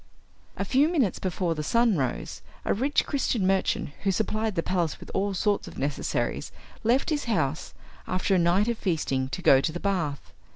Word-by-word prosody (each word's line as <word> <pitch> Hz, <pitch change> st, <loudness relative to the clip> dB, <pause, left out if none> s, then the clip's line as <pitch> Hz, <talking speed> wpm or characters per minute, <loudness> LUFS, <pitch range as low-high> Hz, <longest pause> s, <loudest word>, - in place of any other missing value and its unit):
A -, -, -1 dB
few 275 Hz, +3 st, +3 dB
minutes 275 Hz, -, +1 dB
before 180 Hz, -2 st, -1 dB
the 155 Hz, -, -4 dB
sun 230 Hz, +7 st, +3 dB
rose, 130 Hz, -5 st, -3 dB, 0.2 s
a -, -, +2 dB
rich 270 Hz, +7 st, +1 dB
Christian 250 Hz, -7 st, 0 dB
merchant, 190 Hz, -4 st, +1 dB
who 195 Hz, -, +1 dB
supplied 215 Hz, +1 st, -1 dB
the 165 Hz, -, 0 dB
palace 175 Hz, -4 st, -1 dB
with -, -, -10 dB
all 195 Hz, 0 st, 0 dB
sorts 205 Hz, +2 st, 0 dB
of -, -, -10 dB
necessaries, 140 Hz, +1 st, -2 dB, 0.3 s
left 245 Hz, +7 st, +2 dB
his 295 Hz, -1 st, 0 dB
house, 160 Hz, -, -1 dB, 0.3 s
after 185 Hz, +2 st, 0 dB
a 185 Hz, -, +4 dB
night 175 Hz, +5 st, +3 dB
of 235 Hz, -1 st, -1 dB
feasting, 135 Hz, -7 st, -1 dB
to -, -, -5 dB
go 135 Hz, -, +6 dB
to 160 Hz, -, 0 dB
the 175 Hz, -, -5 dB
bath. 150 Hz, -, -2 dB
190 Hz, 190 wpm, -27 LUFS, 160-220 Hz, 0.3 s, go